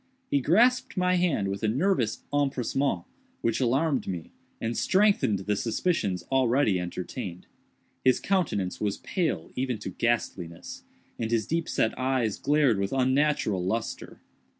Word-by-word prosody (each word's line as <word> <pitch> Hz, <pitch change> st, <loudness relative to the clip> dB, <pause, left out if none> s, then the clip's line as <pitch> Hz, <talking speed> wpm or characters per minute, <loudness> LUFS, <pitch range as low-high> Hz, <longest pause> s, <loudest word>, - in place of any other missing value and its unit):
He 140 Hz, -, +3 dB
grasped 230 Hz, -, +3 dB
my 180 Hz, 0 st, +2 dB
hand 175 Hz, -, +1 dB
with 100 Hz, 0 st, -3 dB
a 110 Hz, -, +1 dB
nervous 130 Hz, -, +1 dB
empressement 135 Hz, -6 st, 0 dB, 0.4 s
which 115 Hz, -, 0 dB
alarmed 135 Hz, 0 st, +1 dB
me 90 Hz, -4 st, -5 dB, 0.3 s
and 115 Hz, +1 st, -2 dB
strengthened 195 Hz, -, +3 dB
the 105 Hz, +2 st, -1 dB
suspicions 105 Hz, -, -1 dB
already 130 Hz, -6 st, +3 dB
entertained. 90 Hz, +1 st, -5 dB, 0.6 s
His 130 Hz, -1 st, +4 dB
countenance 125 Hz, -, -1 dB
was 105 Hz, -2 st, 0 dB
pale 155 Hz, -, -2 dB
even 125 Hz, -2 st, -1 dB
to -, -, -6 dB
ghastliness, 95 Hz, -8 st, -2 dB, 0.4 s
and 115 Hz, -, -1 dB
his 115 Hz, -3 st, +1 dB
deep 165 Hz, 0 st, -1 dB
set 110 Hz, -, +1 dB
eyes 130 Hz, -5 st, 0 dB
glared 145 Hz, -8 st, +3 dB
with 100 Hz, +3 st, -1 dB
unnatural 130 Hz, -7 st, +2 dB
lustre. 110 Hz, +5 st, -3 dB
125 Hz, 135 wpm, -27 LUFS, 100-145 Hz, 0.6 s, His